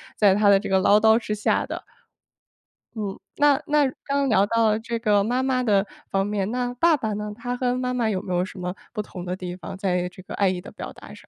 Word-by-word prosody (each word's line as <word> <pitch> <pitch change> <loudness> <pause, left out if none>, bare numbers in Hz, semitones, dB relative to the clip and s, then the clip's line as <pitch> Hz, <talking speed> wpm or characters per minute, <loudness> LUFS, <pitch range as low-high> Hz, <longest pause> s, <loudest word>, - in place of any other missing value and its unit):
在 200 -3 +4
她 210 0 +3
的 200 -1 +6
这 205 - -5
个 190 - +4
唠 205 +2 +5
叨 220 +1 +5
之 220 -2 -3
下 210 0 +1
的。 - - -6 1.1
嗯， 205 -3 -4 0.2
那 290 -1 +4
那 295 -1 +3 0.2
刚 280 0 0
刚 275 -1 +1
聊 200 -3 +4
到 220 0 +2
这 230 +1 -4
个 210 -3 +3
妈 245 +4 0
妈 260 -1 +1
的 205 -4 +2 0.2
方 195 0 +1
面， 205 -1 -1
那 245 0 -1
爸 330 +5 +4
爸 220 -7 -2
呢？ 210 0 -4
他 245 +2 -4
和 250 0 0
妈 250 0 -1
妈 245 -3 0
有 195 -4 -1
没 180 -2 -3
有 175 +1 +1
什 185 - -10
么 180 +1 -4 0.2
不 215 - -2
同 185 -3 -8
的 180 0 -2
地 180 -1 -6
方， 185 - -8
在 180 -2 0
这 180 - -13
个 185 - -8
爱 200 - +2
意 185 -1 -1
的 - - -11
表 - - -8
达 - - -13
上？ - - -17
210 Hz, 270 characters per minute, -24 LUFS, 195-245 Hz, 1.1 s, 的